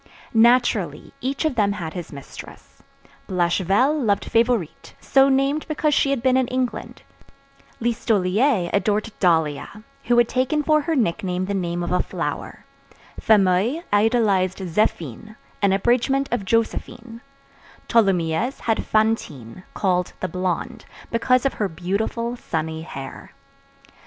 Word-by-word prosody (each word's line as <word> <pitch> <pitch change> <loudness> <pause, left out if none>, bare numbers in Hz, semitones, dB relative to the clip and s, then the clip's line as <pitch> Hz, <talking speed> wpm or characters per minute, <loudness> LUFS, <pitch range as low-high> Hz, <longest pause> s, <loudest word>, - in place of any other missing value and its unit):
Naturally, 225 - +2
each 275 +5 -2
of 310 - +1
them 205 -4 +1
had 165 -6 -6
his 175 -3 -7
mistress. 140 -1 -12 0.5
Blachevelle 190 - +2
loved 200 -3 +1
Favourite, 230 -7 0
so 270 0 +4
named 275 +3 +1
because 305 -1 0
she 275 - +2
had 275 -4 -1
been 260 -1 +3
in 260 -2 +1
England; 255 -1 -3 0.8
Listolier 220 -2 +1
adored 210 +2 0
Dahlia, 165 +3 0 0.2
who 240 0 +2
had 240 -1 +5
taken 260 +5 0
for 305 0 +3
her 325 +2 -1
nickname 185 - -1
the 200 - -3
name 175 -2 -2
of 175 - -3
a 180 - +2
flower; - - -5 0.5
Fameuil 210 - +2
idolized 205 -4 +2
Zéphine, 190 - -2 0.3
an 200 -1 +3
abridgment 245 +7 +1
of 230 -5 -1
Joséphine; 230 +2 -2 0.7
Tholomyès 195 +2 +1
had 225 -1 0
Fantine, 185 - -1
called 180 -3 0
the 185 - -2
Blonde, 180 +1 -3 0.3
because 255 +2 +2
of 275 - +1
her 205 -3 -2
beautiful, 200 +8 -2
sunny 160 -7 -4
hair. 135 -4 -9
215 Hz, 125 wpm, -22 LUFS, 180-245 Hz, 0.8 s, had